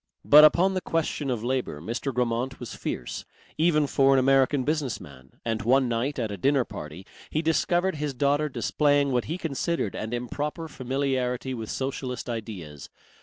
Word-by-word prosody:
But 150 +1 +9
upon 180 +5 +5
the 185 - -1
question 155 -4 -1
of 120 -3 -2
labour 125 - -2
Mr. 115 - -3
Grammont 125 +1 -1
was 120 - -7
fierce, - - -5 0.4
even 155 -2 +3
for 135 -1 +3
an - - +4
American 135 +1 +3
business 150 -4 -1
man, 65 -2 -14
and 115 -1 -1
one 130 +3 +3
night 120 +5 -1
at 115 -4 -2
a 100 - -5
dinner 135 +5 +2
party 75 +5 -8 0.2
he 155 - -1
discovered 175 +2 +1
his 145 -2 -3
daughter 145 +3 +1
displaying 145 0 +2
what 125 -2 +1
he 165 - -3
considered 165 - -2
an 110 - -5
improper 145 +7 -3
familiarity 130 -2 -2
with 115 -3 -5
socialist 130 -2 -3
ideas. 95 - -7
130 Hz, 170 wpm, -26 LUFS, 115-150 Hz, 0.4 s, But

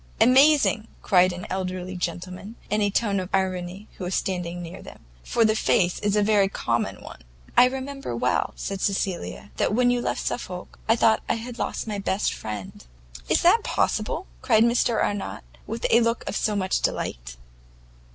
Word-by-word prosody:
"Amazing!" 265 -3 +5 0.2
cried 185 -2 +4
an 180 0 -7
elderly 185 0 -3
gentleman, 180 +4 -5 0.2
in 210 0 +2
a 205 - +2
tone 200 -1 +1
of 185 -1 -5
irony, 185 +1 -2
who - - -5
was 180 +1 -2
standing 180 -2 -2
near 175 0 -8
them, - - -13 0.2
"for 230 - +2
the 215 0 +3
face 180 -4 +2
is 205 0 0
a 210 - +3
very 205 -2 +3
common 115 -10 -2
one!" - - -11 0.3
"I - - +8
remember 265 - -4
well," 125 +2 0
said 195 -1 -4
Cecilia, 195 0 -2
"that 210 - +1
when 245 0 +4
you 245 0 +1
left - - -2
Suffolk 180 -6 -5
I 225 - +6
thought 225 -1 +3
I - - +2
had 235 +1 -7
lost - - -2
my 210 -2 -3
best 195 0 0
friend." 105 - -7 0.5
"Is - - +3
that - - +5
possible?" - - -1 0.2
cried 220 - +4
Mr 235 -1 +2
Arnott, 205 -1 -3 0.2
with 225 +2 -4
a 235 - +6
look 230 0 0
of 210 0 0
much 190 -1 0
delight. - - -3
200 Hz, 175 wpm, -25 LUFS, 180-225 Hz, 0.5 s, I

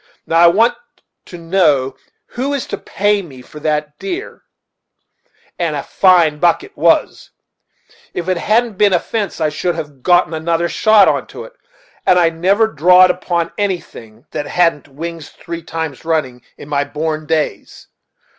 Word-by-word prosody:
Now 165 - +1
I 170 - +7
want 225 +8 +4 0.5
to 175 - -10
know 165 -7 +1 0.3
who 270 +4 -2
is 275 - -3
to 200 - -5
pay 205 0 0
me 135 -8 -12
for 150 - -12
that 150 -1 -2
deer; 390 +3 -6 1.2
and 165 -3 -1
a 140 - -3
fine 170 -5 +3
buck 175 - +2
it 400 - -14
was. - - +1 0.8
If 175 - -4
there 185 - +1
hadn't 215 +3 0
been 205 -2 +4
a 175 - +3
fence 210 +1 -4
I 155 -1 +1
should 170 +3 -2
have 145 -5 -7
gotten 175 +1 +3
another 165 +2 -1
shot 215 -2 +4
into - - -2
it; - - -13 0.5
and 180 - +4
I 170 -2 +3
never 190 +7 +2
drawed 180 +1 +5
upon 175 -2 -3
anything 140 - -5
that 145 - -4
hadn't 165 -4 +1
wings 160 +2 -7
three 170 -1 -8
times 160 -4 -5
running, 150 -7 -2 0.2
in - - -11
my 145 -1 0
born 155 +1 -4
days. 155 -2 -3
170 Hz, 160 wpm, -16 LUFS, 150-190 Hz, 1.2 s, I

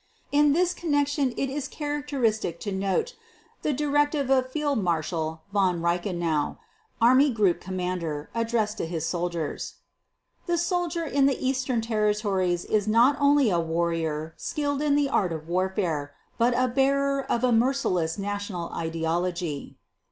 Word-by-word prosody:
In 290 0 +4
this 355 +2 +2
connection 290 -4 0
it 275 - 0
is 280 +1 -3
characteristic 280 - -2
to 205 - -3
note 195 - -1 0.5
the 300 - 0
directive 290 0 +1
of 255 -1 +2
Fieldmarshal 170 - -1
Von 185 -4 +2
Reichenau, 170 -3 -1 0.4
army 255 +5 +6
group 210 -8 +2
commander, 180 -5 -3
addressed 230 -2 -1
to - - -2
his 165 -2 -3
soldiers: 170 -3 -3 0.7
"The 345 0 +1
soldier 345 -1 -1
in 280 -2 +3
the 275 - +1
eastern 255 -2 0
territories 210 -5 0
is 215 -1 0
not 235 +6 +5
only 285 -5 +4
a 175 - +2
warrior 165 -1 -1
skilled 285 -1 -2
in 295 -1 +2
the 290 -1 +3
art 190 -9 +1
of 160 -1 -5
warfare 175 -5 -1 0.2
but 240 +1 +3
a 255 0 +3
bearer 275 +2 +2
of 235 - 0
a 250 - +3
merciless 225 -9 +1
national 205 -3 -4
ideology." 165 -1 -2
215 Hz, 135 wpm, -26 LUFS, 175-275 Hz, 0.7 s, army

